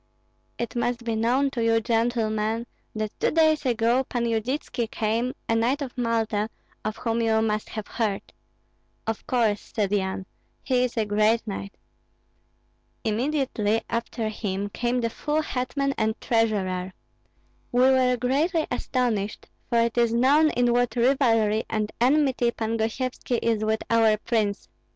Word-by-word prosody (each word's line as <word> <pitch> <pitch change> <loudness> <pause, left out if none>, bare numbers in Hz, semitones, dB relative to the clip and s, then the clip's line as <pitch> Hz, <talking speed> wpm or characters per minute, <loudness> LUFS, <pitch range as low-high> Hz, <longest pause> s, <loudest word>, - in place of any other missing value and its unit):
"It 235 +1 -4
must 240 0 -1
be 230 -1 -1
known 250 +5 +2
to 240 -4 -2
you, 225 0 +3
gentlemen, 225 -1 0 0.3
that 215 -1 -2
two - - +2
days 315 -3 +3
ago 240 +2 +2
Pan 240 -2 -2
Yudytski 230 +1 -2
came, 230 +4 -1
a - - +1
knight 245 +6 +1
of 260 - -7
Malta, 225 -3 0 0.3
of 215 0 -3
whom 230 0 -1
you 220 -1 +2
must 215 -1 -1
have 215 -2 -5
heard." 210 -4 -3 0.7
"Of 225 -1 -4
course," 225 -5 0
said 205 -4 0
Yan; 190 -2 -1 0.4
"he 250 -1 +2
is 245 - -6
a 220 - +2
great 215 +2 +2
knight." 200 -1 -6 1.3
"Immediately 225 -2 0
after 230 -1 -2
him 205 -2 -3
came 245 +4 -1
the 230 -1 -1
full 300 +5 -1
hetman 275 +1 -1
and 220 0 0
treasurer. 190 -5 0 0.8
We 245 - +3
were 255 -1 +4
greatly 300 +7 +1
astonished, 245 -5 -1 0.2
for 235 -1 +3
it 235 +1 +1
is 235 -1 +3
known 275 +7 +4
in 245 -3 +2
what 245 0 +1
rivalry 230 -4 +3
and 215 -1 -1
enmity 265 -2 +3
Pan 225 -1 -2
Gosyevski 240 +2 -2
is 225 -2 +1
with 220 0 0
our 225 -2 +4
prince. 215 -2 -1
230 Hz, 145 wpm, -25 LUFS, 215-250 Hz, 1.3 s, were